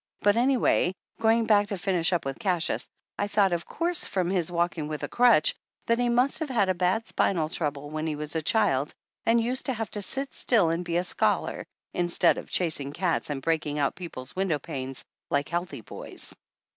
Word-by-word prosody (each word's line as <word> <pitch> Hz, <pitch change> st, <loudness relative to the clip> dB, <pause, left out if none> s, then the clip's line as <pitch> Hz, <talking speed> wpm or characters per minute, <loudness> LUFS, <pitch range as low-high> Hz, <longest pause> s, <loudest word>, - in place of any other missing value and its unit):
But, 205 Hz, 0 st, +4 dB
anyway, 240 Hz, -7 st, +3 dB, 0.2 s
going 225 Hz, 0 st, +3 dB
back 205 Hz, -2 st, +4 dB
to 200 Hz, -, -3 dB
finish 180 Hz, -2 st, +1 dB
up 175 Hz, -5 st, 0 dB
with 135 Hz, 0 st, -4 dB
Cassius, 180 Hz, -4 st, 0 dB, 0.3 s
I 205 Hz, -, +1 dB
thought 200 Hz, -3 st, +3 dB
of 170 Hz, 0 st, -2 dB
course, 345 Hz, 0 st, 0 dB
from 185 Hz, -2 st, -1 dB
his 175 Hz, -3 st, 0 dB
walking 170 Hz, -3 st, 0 dB
with 150 Hz, -1 st, -5 dB
a -, -, -1 dB
crutch, 240 Hz, -10 st, +4 dB, 0.3 s
that 230 Hz, +1 st, +2 dB
he 245 Hz, 0 st, +2 dB
must 250 Hz, +5 st, +2 dB
have 315 Hz, -3 st, -3 dB
had 210 Hz, -7 st, +2 dB
a -, -, +4 dB
bad 185 Hz, +5 st, +1 dB
spinal 165 Hz, -8 st, +1 dB
trouble 145 Hz, -4 st, -3 dB
when 155 Hz, +1 st, -2 dB
he 155 Hz, -, -1 dB
was 150 Hz, +1 st, -5 dB
a 160 Hz, -, +1 dB
child 150 Hz, -6 st, +1 dB, 0.3 s
and 230 Hz, +1 st, +5 dB
used 250 Hz, +4 st, -1 dB
to 265 Hz, -, +1 dB
have 225 Hz, -1 st, -4 dB
to 210 Hz, -, -4 dB
sit 270 Hz, +7 st, -3 dB
still 200 Hz, -10 st, +3 dB
and 165 Hz, +2 st, -1 dB
be 170 Hz, -1 st, -1 dB
a 175 Hz, -, +1 dB
scholar, -, -, 0 dB, 0.3 s
instead 175 Hz, -1 st, +2 dB
of -, -, -10 dB
chasing 150 Hz, -5 st, -1 dB
cats 175 Hz, -1 st, 0 dB
and 135 Hz, -2 st, -3 dB
breaking 155 Hz, -3 st, 0 dB
out 140 Hz, -2 st, +1 dB
people's 150 Hz, -8 st, -8 dB
window 185 Hz, -5 st, +1 dB
panes 135 Hz, -3 st, -5 dB, 0.2 s
like 145 Hz, -2 st, 0 dB
healthy 170 Hz, -6 st, -3 dB
boys. -, -, -9 dB
180 Hz, 205 wpm, -27 LUFS, 155-220 Hz, 0.3 s, and